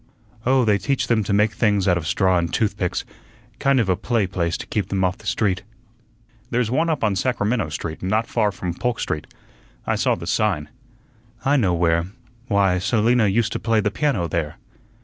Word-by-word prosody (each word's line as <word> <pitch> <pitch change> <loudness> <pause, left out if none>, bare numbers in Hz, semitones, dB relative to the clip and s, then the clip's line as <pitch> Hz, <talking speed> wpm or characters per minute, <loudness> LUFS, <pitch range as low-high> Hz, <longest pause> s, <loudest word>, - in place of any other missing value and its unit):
"Oh, 130 -1 +4
they 105 -2 +3
teach 135 +8 0
them 115 -2 +1
to - - -2
make 105 +1 +3
things 105 -4 +1
out 90 - +4
of 85 -2 -3
straw 95 0 +2
and 85 -1 -2
toothpicks 100 -5 -1 0.5
kind 135 -1 +3
of 115 - +1
a 95 - +2
play 115 +2 0
place 85 -2 -1
to - - -7
keep 100 -4 -2
them 95 -1 -1
off 90 0 0
the - - -11
street." 100 -4 0 0.9
"There's 120 -3 0
one 160 +6 +1
up 155 - -1
on 105 -3 +2
Sacramento 115 -4 0
Street, 80 +1 -5
not 105 +5 0
far 110 -3 +1
from 90 -2 -4
Polk 120 +5 -2
Street. 75 -1 -3 0.6
I - - +1
saw - - +1
the - - -8
sign." 85 -5 0 0.8
"I 140 +2 +4
know 100 -10 +2
where. 85 0 +1 0.4
Why, 100 -4 +2
Selina 110 +3 +2
used 110 +2 +1
to - - -2
play 115 -1 +1
the 105 -1 0
piano 120 - 0
there." 80 -3 -3
105 Hz, 195 wpm, -22 LUFS, 90-115 Hz, 0.9 s, Oh